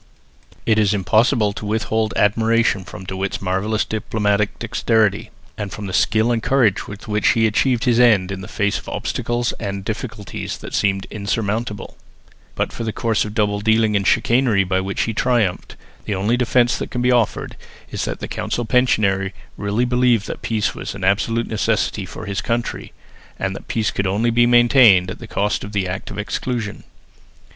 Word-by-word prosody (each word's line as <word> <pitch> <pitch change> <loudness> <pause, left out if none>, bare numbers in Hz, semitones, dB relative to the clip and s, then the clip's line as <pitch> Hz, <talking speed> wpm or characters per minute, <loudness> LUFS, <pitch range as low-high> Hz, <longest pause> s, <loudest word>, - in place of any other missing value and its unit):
It 110 -1 +3
is 105 -1 +3
impossible 110 +3 +2
to - - -8
withhold 110 +1 -1
admiration 110 -2 +2
from 90 - -9
De 95 0 -6
Witt's 95 0 -2
marvellous 95 +4 -1
diplomatic 105 -1 -1
dexterity, 110 -3 +1 0.3
and 100 -2 -4
from 105 - -6
the 95 - -5
skill 110 +5 +2
and 115 -1 0
courage 120 -6 +2
with 105 +1 -9
which 105 0 0
he 115 -1 +2
achieved 120 +3 +1
his 120 -2 +3
end 105 -6 +4
in 95 -1 -5
the 90 - -8
face 100 -1 -1
of - - -10
obstacles 120 0 -2
and 100 -2 -4
difficulties 110 -2 -5
that - - -10
seemed 95 -1 +1
insurmountable; 105 0 -3 0.6
but - - -2
for - - -5
the 110 - -2
course 110 -1 0
of 105 0 -7
double 105 -2 +1
dealing 110 0 +2
and 100 -1 +1
chicanery 120 -5 +3
by 95 0 0
which 95 +1 -2
he 115 - -2
triumphed, 110 -6 0 0.3
the 105 - -2
only 100 +5 +1
defence 120 0 +2
that - - -4
can 125 - -3
be 125 - +3
offered 120 -4 0 0.4
is - - -2
that - - -4
the - - -4
council 120 - -3
pensionary 100 -6 +2 0.2
really 100 +4 0
believed 125 -3 +2
that - - -6
peace 110 -2 -1
was - - -6
an 100 - -7
absolute 115 +4 +1
necessity 110 -3 -1
for 110 - -8
his 100 -1 -3
country, 120 0 -3 0.5
and 95 0 -2
that - - -10
peace 110 -2 0
could 100 - -1
only 110 +5 +1
be 120 +1 +4
maintained 120 -6 +5
at - - -8
the 115 - -9
cost 105 -1 -1
of 105 - -8
the 100 -2 0
Act 90 +1 -5
of - - -7
Exclusion. 110 +1 -3
110 Hz, 185 wpm, -20 LUFS, 100-115 Hz, 0.6 s, maintained